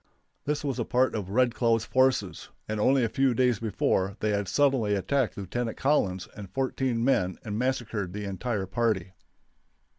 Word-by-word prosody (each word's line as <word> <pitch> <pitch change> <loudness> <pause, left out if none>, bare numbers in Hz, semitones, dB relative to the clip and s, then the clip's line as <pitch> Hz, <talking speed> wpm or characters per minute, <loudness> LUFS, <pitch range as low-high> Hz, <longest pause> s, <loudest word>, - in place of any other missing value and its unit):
This 150 +1 -1
was 135 -4 -2
a - - +1
part 130 +1 +1
of 100 -4 -4
Red 120 +3 +2
Cloud's 115 -2 +1
forces, 130 0 +1 0.2
and 110 0 -3
only 130 +4 +3
a - - +2
few 130 +2 +1
days 125 -3 +2
before 100 -2 0
they 105 - 0
had 100 -1 -1
suddenly 130 -4 +2
attacked 115 +6 0
Lieutenant 115 +4 -3
Collins 95 -10 +1
and 100 -3 -8
fourteen 130 -2 -1
men 95 -9 +1
and 105 -2 -3
massacred 115 -7 -2
the 105 +2 -5
entire 100 +1 -2
party. 95 -3 -1
115 Hz, 170 wpm, -27 LUFS, 100-130 Hz, 0.2 s, only